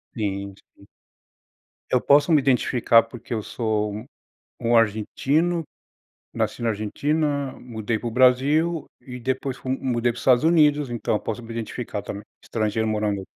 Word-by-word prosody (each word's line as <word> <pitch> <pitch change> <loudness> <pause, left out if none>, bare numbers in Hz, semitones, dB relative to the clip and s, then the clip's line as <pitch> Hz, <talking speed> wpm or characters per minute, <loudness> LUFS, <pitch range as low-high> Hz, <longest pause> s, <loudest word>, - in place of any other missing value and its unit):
Sim, 100 -3 -3 0.2
sim. - - -19 1.0
Eu 125 - +2
posso 145 +3 +4
me 155 - +6
identificar, 125 -3 +3
porque 120 0 -8
eu 110 - -1
sou 105 -3 -2
um 110 +3 -7 0.6
um 115 +1 +3
argentino, 140 +10 +1 0.7
nasci - - -2
na 115 -1 +1
Argentina, 140 +6 -1
mudei 110 -2 -3
para 120 - -3
o - - -4
Brasil 140 +7 +3 0.2
e 125 0 -9
depois 130 +1 -2
fu 130 - -9
mudei 120 -2 0
para - - -15
o - - -6
Estados 125 -1 +4
Unidos, 150 -4 +4
então, 110 -2 -1
posso 110 +2 -4
me 115 - -11
identificar 115 -2 -5
também, 100 +1 -7 0.2
estrangeiro 110 0 -1
morando 105 -2 -1
120 Hz, 155 wpm, -23 LUFS, 110-140 Hz, 1.0 s, me